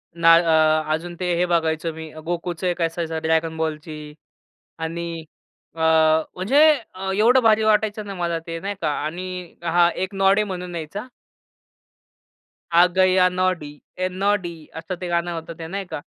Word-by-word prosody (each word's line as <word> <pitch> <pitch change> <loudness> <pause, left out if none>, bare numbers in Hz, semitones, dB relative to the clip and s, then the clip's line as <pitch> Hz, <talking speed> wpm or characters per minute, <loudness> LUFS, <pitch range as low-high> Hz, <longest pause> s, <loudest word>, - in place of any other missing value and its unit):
ना 165 0 +6
अ, 160 -2 +3
अजून 170 +2 -4
ते 180 -1 0
हे 175 +1 +2
बघायचो 165 -2 0
मी, 160 0 -9
गोकुचं 175 +1 -3
1 175 -1 -2
असायचं 165 -1 -2
ड्रॅगन 160 0 0
बॉलची 155 -1 -5 0.7
आणि 165 0 -4 0.5
अ, - - -11 0.6
म्हणजे 190 +10 0 0.6
एवढं 245 +4 +5
भारी 220 -1 +4
वाटायचं 215 0 +1
ना 200 - -5
मला 170 -2 -2
ते, 165 0 -4
नाही 200 +3 -4
का? 155 - 0 0.2
आणि 180 +2 -6
हां, 170 0 +4
एक 190 - -5
नॉडी 195 +2 +3
म्हणून 180 -3 -6
यायचा. 170 +8 -6 1.6
आ 170 +1 +6
गया 185 -1 +5
नॉडी 180 -5 -2 0.3
ए - - +2 0.2
नॉडी 195 -4 0 0.3
असं 180 +3 -5
ते 180 - -3
गाणं 170 +1 -1
होतं 165 +1 -9
ते 165 - -6
नाही 195 +3 -4
का? - - -4
170 Hz, 150 wpm, -22 LUFS, 160-185 Hz, 1.6 s, ना